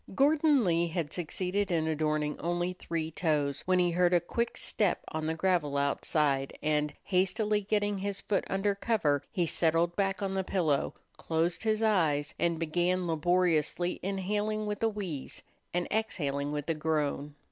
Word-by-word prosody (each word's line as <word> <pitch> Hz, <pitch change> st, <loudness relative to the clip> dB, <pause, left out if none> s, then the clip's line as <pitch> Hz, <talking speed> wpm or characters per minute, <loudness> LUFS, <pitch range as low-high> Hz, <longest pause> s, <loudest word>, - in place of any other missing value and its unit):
Gordon 295 Hz, 0 st, +4 dB
Lee 170 Hz, -2 st, +2 dB
had 165 Hz, -3 st, -3 dB
succeeded 185 Hz, +4 st, -2 dB
in 160 Hz, -3 st, +1 dB
adorning 155 Hz, -1 st, 0 dB
only 175 Hz, +1 st, -1 dB
three 165 Hz, -3 st, -4 dB
toes 150 Hz, -4 st, 0 dB
when 185 Hz, 0 st, +4 dB
he 175 Hz, -1 st, +3 dB
heard 175 Hz, +1 st, +3 dB
a -, -, +5 dB
quick 235 Hz, +7 st, -2 dB
step 205 Hz, -5 st, 0 dB
on 155 Hz, 0 st, -3 dB
the 160 Hz, +1 st, -1 dB
gravel 165 Hz, -5 st, +1 dB
outside 140 Hz, -1 st, +1 dB
and, 150 Hz, -1 st, +1 dB
hastily 210 Hz, +3 st, +1 dB
getting 205 Hz, 0 st, 0 dB
his 200 Hz, 0 st, -3 dB
foot 200 Hz, -, 0 dB
under 195 Hz, +1 st, +1 dB
cover, 195 Hz, -, +1 dB
he 175 Hz, -, +1 dB
settled 165 Hz, +1 st, +1 dB
back 195 Hz, 0 st, 0 dB
on 195 Hz, -1 st, -1 dB
the 190 Hz, 0 st, 0 dB
pillow, 165 Hz, -7 st, 0 dB, 0.2 s
closed 165 Hz, +1 st, 0 dB
his 220 Hz, 0 st, +1 dB
eyes, 160 Hz, -9 st, +2 dB
and 170 Hz, -1 st, +1 dB
began 175 Hz, +3 st, 0 dB
laboriously 175 Hz, +1 st, +1 dB
inhaling 205 Hz, +3 st, -1 dB
with 210 Hz, -1 st, -3 dB
a 225 Hz, -, +3 dB
wheeze 185 Hz, -10 st, -5 dB, 0.3 s
and 175 Hz, 0 st, -1 dB
exhaling 145 Hz, -10 st, -1 dB
with 150 Hz, -1 st, -3 dB
a 165 Hz, -, +2 dB
groan. 150 Hz, -2 st, -1 dB
175 Hz, 160 wpm, -30 LUFS, 155-195 Hz, 0.3 s, a